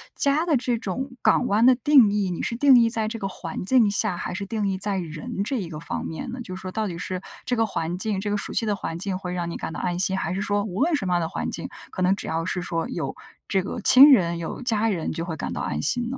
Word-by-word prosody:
家 290 +4 +2
的 315 -6 +3
这 245 -1 -1
种 250 +6 -4
港 250 - +3
湾 215 +4 +3
的 255 - +7
定 260 -4 +5
义， 205 -2 0
你 175 - -3
是 235 - -3
定 270 -1 +6
义 230 -1 +4
在 220 -2 0
这 225 +1 -4
个 195 - -3
环 185 - -6
境 225 +1 +4
下， 200 -2 0
还 - - -4
是 200 +2 -4
定 210 0 -2
义 190 -1 -1
在 200 +1 -1
人 170 +3 -4
这 270 - -2
一 175 - -6
个 150 - -7
方 165 - -5
面 160 +9 -5
呢？ 250 - -6
就 185 -6 -7
是 - - -9
说 185 - -5
到 220 -1 -1
底 170 - -5
是 180 +1 -4 0.2
这 245 - 0
个 225 - +2
环 175 -4 -3
境， 200 0 -1
这 205 - -3
个 205 - 0
熟 - - -3
悉 230 - 0
的 210 -1 0
环 165 -3 -5
境 190 0 -2
会 185 -1 -6
让 175 -1 -3
你 - - -5
感 - - -5
到 - - -6
安 175 -1 -2
心， 190 +1 +1
还 190 - -2
是 195 - -2
说 205 0 0
无 195 +2 -4
论 330 +4 +2
什 285 - 0
么 180 - 0
样 175 - +2
的 165 - -2
环 - - -3
境， - - -5 0.2
可 185 - -6
能 185 +1 +4
只 - - -6
要 165 +1 -1
是 180 +1 -2
说 165 -2 -3
有 - - -4 0.3
这 190 -2 +1
个 200 - -5
亲 265 +6 +8
人， 170 -9 +4
有 165 - -5
家 225 -3 +1
人 175 -6 -2
就 165 - -3
会 165 -2 -5
感 - - -4
到 - - -4
安 75 - -2
心 240 - 0
呢？ 265 - -4
200 Hz, 325 characters per minute, -24 LUFS, 180-235 Hz, 0.3 s, 亲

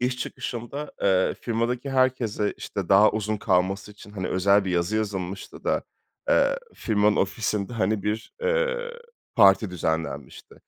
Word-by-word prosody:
iş 125 +1 0
çıkışında, 130 +3 -5
eee, 95 -1 +3
firmadaki 120 +3 -2
herkese, 125 -5 +1
işte, 95 -4 -5
daha 100 +2 +6
uzun 110 0 -2
kalması 95 +1 0
için, 105 0 -14
hani, 95 -3 -4
özel 100 +2 +3
bir 95 - -2
yazı 90 +5 0
yazılmıştı 100 -3 -4
da, - - +1 0.5
eee, - - +3 0.2
firmanın 105 -1 +2
ofisinde, 100 +2 -1
hani, 110 -2 0
bir, 105 +2 -3
eee, 485 0 0 0.4
parti 100 -2 +5
düzenlenmişti. 80 -2 -4
105 Hz, 135 wpm, -25 LUFS, 95-120 Hz, 0.5 s, daha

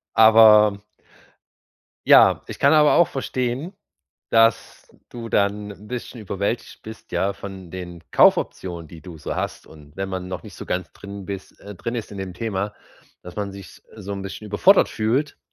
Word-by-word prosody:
Aber 110 -2 +7 1.3
ja, - - +6
ich - - -8
kann 140 - +4
aber 150 -1 +5
auch 170 - +5
verstehen, 130 +4 -3 0.6
dass, 115 -2 +2 0.2
du 115 -1 -7
dann 105 +1 0
'n 105 +2 -15
bisschen 125 -1 -6
überwältigt 100 +3 -4
bist, 110 +1 -12
ja, 100 +1 0
von 95 -3 -10
den 90 -2 -8
Kaufoptionen 85 -4 +2
die 85 - -12
du 85 -4 -10
so 75 - -5
hast. - - -4
Und 75 0 -16
wenn 95 0 -3
man 95 -1 -5
noch 90 -3 -6
nicht - - -12
so - - -8
ganz 90 -1 -3
drin 100 -1 -10
bist 100 -2 -8
äh, 100 0 -10
drin 115 +6 -5
ist 115 -3 -5
in 100 - -8
dem 95 -1 -5
Thema, 105 -1 -3 0.5
dass 90 - -11
man 100 -2 -3
sich 95 -4 -12
so 100 -1 -7
'n 100 - -5
bisschen 100 +2 -8
überfordert 180 - +4
fühlt 120 +7 -1
100 Hz, 175 wpm, -22 LUFS, 95-115 Hz, 1.3 s, Aber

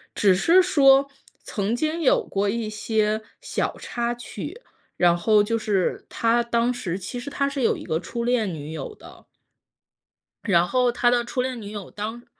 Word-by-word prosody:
只 200 -2 +4
是 335 - +5
说 275 -5 +5 0.3
曾 205 +2 -2
经 310 +6 -1
有 280 - +3
过 200 +1 -1
一 225 0 -2
些 215 0 0 0.2
小 - - -2
插 240 0 -3
曲， 240 - -8 0.3
然 175 -1 +3
后 210 +4 +4
就 230 +2 0
是 205 -4 -1
他 230 +1 +1
当 235 +1 +1
时， 190 -8 -4
其 200 +6 -6
实 245 - -6
他 280 0 0
是 280 -1 -4
有 235 - +2
一 - - -8
个 160 - -1
初 235 +7 -5
恋 235 -6 +1
女 150 0 -7
友 160 - -6
的。 - - -15 1.2
然 175 -5 +3
后 250 +1 +2
他 240 0 +2
的 240 -1 +2
初 250 +1 -2
恋 255 -2 -3
女 205 -1 -8
友 205 -3 -7
当 220 +3 -6
230 Hz, 195 characters per minute, -24 LUFS, 205-250 Hz, 1.2 s, 是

